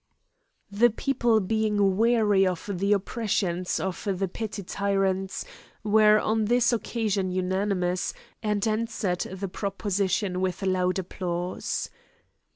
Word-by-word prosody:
The 225 +4 +4
people 240 -1 +1
being 210 -1 +1
weary 215 -3 +3
of 180 0 -3
the 195 +2 0
oppressions 195 -3 0
of 190 +1 -4
the 195 +1 -1
petty 210 +2 -5
tyrants, 195 0 -1 0.4
were 215 0 +5
on 220 +1 +1
this 240 +2 +3
occasion 210 -4 -1
unanimous, 185 0 0 0.3
and 210 -1 0
answered 215 -4 -1
the 190 +1 -4
proposition 195 -1 -1
with 185 +1 -2
loud 185 -1 +1
applause. 180 -1 -3
200 Hz, 110 wpm, -26 LUFS, 185-215 Hz, 0.4 s, were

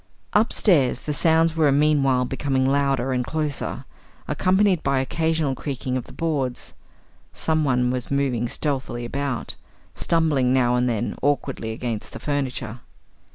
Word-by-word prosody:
Upstairs, 185 - +3
the 150 - -3
sounds 165 +1 +3
were 155 -3 +3
meanwhile 140 -3 +3
becoming 135 0 0
louder 135 -2 +1
and 125 -1 0
closer, 150 +1 -3 0.4
accompanied 190 -1 +2
by 140 0 +1
occasional 160 +1 0
creaking 130 -2 -4
of 130 - -2
the - - -13
boards. 140 -7 -3 0.6
Someone 135 -6 +1
was 125 -1 -3
moving 130 -4 0
stealthily 130 -5 -2
about, 140 +1 -3 0.4
stumbling 150 -7 +1
now 125 -2 +3
and 125 0 +1
then 115 -1 -2
awkwardly 140 -5 -1
against 115 -1 -4
the - - -7
furniture. 130 -5 -3
135 Hz, 130 wpm, -23 LUFS, 125-155 Hz, 0.6 s, Upstairs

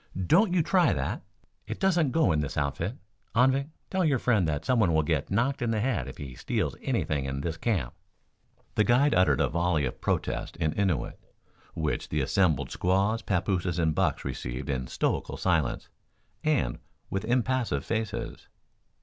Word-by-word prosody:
"Don't 185 - +4
you 175 -3 +3
try 180 +2 +3
that! - - -2 0.5
It - - -5
doesn't 175 -7 +3
go 145 - +3
in 75 - +2
this 75 -2 -3
outfit. 75 - -1 0.4
Anvik, 135 +4 +3 0.2
tell 190 -1 +1
your 145 -5 +3
friend 110 -8 +2
that 75 0 -2
someone 110 -10 +3
will 80 - +3
get 80 -2 -1
knocked 120 +8 0
in 120 - 0
the 110 -1 +1
head 105 - 0
if 65 - -8
he 70 -3 -7
steals - - -2
anything 70 -3 -1
in 70 0 -3
this 80 +2 -2
camp." 85 - -1 0.8
The 110 - +3
guide 125 +6 +4
uttered 75 -7 +4
a - - +3
volley 85 -2 +1
of 60 - -5
protest - - -2
in 80 - 0
Innuit, 90 -11 -1 0.6
which 80 -2 -2
the 75 - 0
assembled 80 -1 +1
squaws, 100 +5 +1
papooses 90 -2 0
and 80 -2 +2
bucks - - 0
received - - -4
in 65 -2 -2
stoical - - -1
silence, 80 -8 0 0.6
and 140 - +1 0.3
with 95 - -1
impassive 120 - 0
faces. 110 0 -3
95 Hz, 165 wpm, -28 LUFS, 75-125 Hz, 0.8 s, Don't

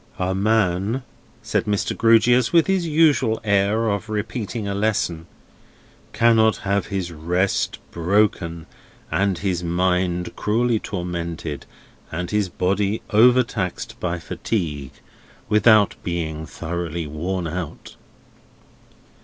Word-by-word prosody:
"A 95 0 -1
man," 105 +3 +1 0.4
said - - 0
Mr. 105 -1 -1
Grewgious, 115 +2 +4
with 170 -1 +5
his 190 -3 0
usual 150 -8 +3
air 100 +2 +2
of 100 +1 -2
repeating 110 0 -3
a 100 - -2
lesson, 100 -5 -1 0.8
"cannot 110 -2 +4
have 100 -1 0
his 95 -3 -3
rest 90 +4 -1
broken, 85 -2 0 0.5
and 100 -2 +1
his 90 -3 -2
mind 90 0 0
cruelly 115 +2 +1
tormented, 85 -6 -5 0.4
and 90 +2 -4
his 105 -2 +1
body 100 +4 0
overtaxed 115 -5 +2
by 90 -1 -2
fatigue, 80 - -3 0.6
without 105 -1 +5
being 80 -3 -3
thoroughly 85 0 -4
worn 85 +5 -3
out." 85 0 -6
95 Hz, 105 wpm, -22 LUFS, 85-110 Hz, 0.8 s, with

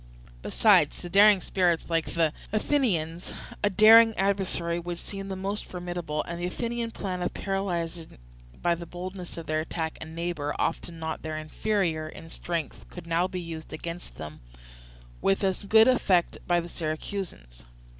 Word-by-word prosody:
Besides, - - +4
to 175 - -7
daring 205 0 +7
spirits 175 -3 +1
like 165 -1 -1
the 165 -2 +2 0.2
Athenians, 195 - 0 0.3
a 205 - +4
daring 220 +2 +7
adversary 190 -3 0
would 175 0 -5
seem 195 +2 -6
the 190 - -4
most 195 +2 -3
formidable; 175 -4 -4
and 170 0 -6
the 175 - 0
Athenian 235 +4 -2
plan 185 -5 -4
of 175 - -2
paralysing 175 - -3 0.5
by 175 - +4
the 170 0 -6
boldness 180 +1 -7
of 165 - -6
their 155 0 0
attack 160 0 -3
a - - -4
neighbour 160 -2 -3
often 165 0 -2
not 160 0 -4
their 155 0 -4
inferior 160 0 -1
in 165 +1 -11
strength 170 -2 -4
could 175 - -9
now 170 +2 +1
be 185 -1 -4
used 165 -2 -7
against 170 +2 -6
them 75 0 -8 0.8
with 195 +1 +2
as 190 -1 +1
good 220 +3 +6
effect 190 -9 +3
by 175 -1 +3
the 170 - -5
Syracusans. 155 - -5
175 Hz, 160 wpm, -27 LUFS, 165-195 Hz, 0.8 s, daring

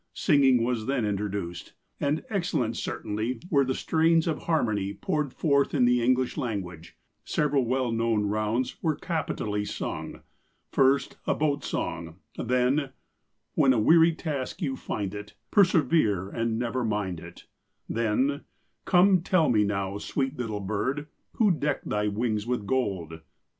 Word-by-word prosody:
Singing 135 -7 +4
was 120 -2 -1
then 135 -4 0
introduced, 100 -4 -3 0.3
and 145 +2 0
excellent 175 - -1
certainly 110 +4 -3
were 140 -3 +4
the 130 0 -1
strains 165 0 +2
of 160 -3 -1
harmony 105 - 0
poured 150 -3 -1
forth 140 0 +1
in 125 -3 +4
the 125 0 +3
English 130 +1 +1
language. 95 - -5 0.3
Several 145 -3 +1
well 130 -1 0
known 115 -2 +1
rounds 110 +4 -1
were 160 -3 +1
capitally 125 - -2
sung. - - -5 0.5
First, 135 +1 +2
a - - +2
boat 145 -2 0
song; 80 -1 -4 0.2
then: 125 +4 +1 0.2
— - - -49
" - - -50
' - - -52
When 130 -1 +4
a 120 - +1
weary 165 +7 +5
task 145 -6 -4
you 135 - -1
find 100 -6 -4
it, 105 0 -8 0.2
Persevere 150 - +3
and 115 +1 -1
never 120 +1 -1
mind 105 -6 -2
it,' - - -12 0.4
Then: 115 +5 0
— - - -44
" - - -45
* - - -50
Come 185 0 +5
tell 175 -3 +2
me 105 -3 +4
now, 100 -1 -2
sweet 135 +5 -2
little 110 -5 -3
bird, 130 +9 -2 0.2
Who 215 -4 +3
decked 150 -4 -1
thy 105 0 0
wings 105 +1 -1
with 125 -4 -1
gold 95 -10 -2
125 Hz, 160 wpm, -27 LUFS, 105-145 Hz, 0.5 s, weary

